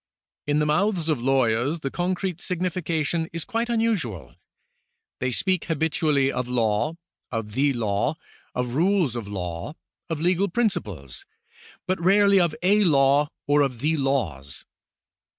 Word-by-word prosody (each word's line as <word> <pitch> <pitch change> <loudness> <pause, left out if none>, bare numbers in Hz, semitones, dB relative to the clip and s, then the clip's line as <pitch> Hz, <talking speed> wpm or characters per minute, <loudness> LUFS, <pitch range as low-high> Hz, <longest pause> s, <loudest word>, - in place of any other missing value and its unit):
In 145 0 +2
the 150 - +2
mouths 175 +2 +1
of 150 -6 0
lawyers 130 +3 +1
the 135 - -3
concrete 180 -1 -2
signification 170 -2 -1
is 165 0 -3
quite 235 0 -2
unusual. 215 - -1 0.9
They 130 - 0
speak 185 +8 0
habitually 155 -3 +1
of 125 -2 -3
law, 120 +5 0 0.4
of 115 -3 -3
the 140 +6 +2
law, 115 +4 0 0.4
of 125 -1 -2
rules 170 - +2
of 115 -4 -4
law, 90 - -5 0.3
of 165 -2 -2
legal 180 +4 +2
principles, 240 - -2 0.6
but 185 -2 -1
rarely 200 +2 +5
of 170 -3 +2
a 205 +3 +4
law 145 -3 +4 0.2
or 145 +1 +3
of 135 -4 0
the 155 +2 +2
laws. 110 - -2
150 Hz, 135 wpm, -24 LUFS, 125-180 Hz, 0.9 s, rarely